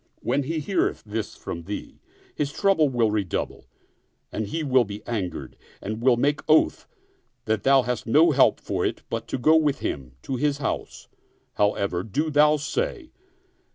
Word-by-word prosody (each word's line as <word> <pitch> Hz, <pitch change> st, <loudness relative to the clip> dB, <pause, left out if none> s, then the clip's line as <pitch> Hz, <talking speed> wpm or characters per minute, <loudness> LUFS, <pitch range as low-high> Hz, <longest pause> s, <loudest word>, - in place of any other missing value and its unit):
When 135 Hz, +4 st, 0 dB
he 160 Hz, +4 st, -3 dB
heareth 155 Hz, +6 st, -1 dB
this 110 Hz, +1 st, -4 dB
from 85 Hz, 0 st, -7 dB
thee, 105 Hz, -, -7 dB, 0.3 s
his 145 Hz, -1 st, -2 dB
trouble 175 Hz, -3 st, +3 dB
will 120 Hz, -4 st, +1 dB
redouble 100 Hz, -5 st, -2 dB, 0.7 s
and 110 Hz, -1 st, -3 dB
he 160 Hz, +9 st, -3 dB
will 130 Hz, -3 st, +4 dB
be 105 Hz, -1 st, -8 dB
angered 100 Hz, -7 st, -4 dB, 0.2 s
and 110 Hz, +3 st, -5 dB
will 125 Hz, -1 st, +4 dB
make 145 Hz, +4 st, +1 dB
oath 155 Hz, -, +3 dB, 0.6 s
that 110 Hz, -2 st, 0 dB
thou 135 Hz, +2 st, +5 dB
hast 120 Hz, -2 st, -3 dB
no 155 Hz, +8 st, +5 dB
help 140 Hz, -2 st, +4 dB
for -, -, -2 dB
it -, -, -2 dB
but 115 Hz, 0 st, -3 dB
to -, -, -2 dB
go 155 Hz, +6 st, +4 dB
with 150 Hz, -3 st, +2 dB
him 65 Hz, -3 st, -4 dB
to 130 Hz, -, -3 dB
his 145 Hz, +1 st, +1 dB
house: 145 Hz, -, -4 dB, 0.5 s
however, 100 Hz, -3 st, 0 dB
do 145 Hz, -, -2 dB
thou 150 Hz, +1 st, +5 dB
say. 425 Hz, -, -3 dB
130 Hz, 165 wpm, -25 LUFS, 110-150 Hz, 0.7 s, thou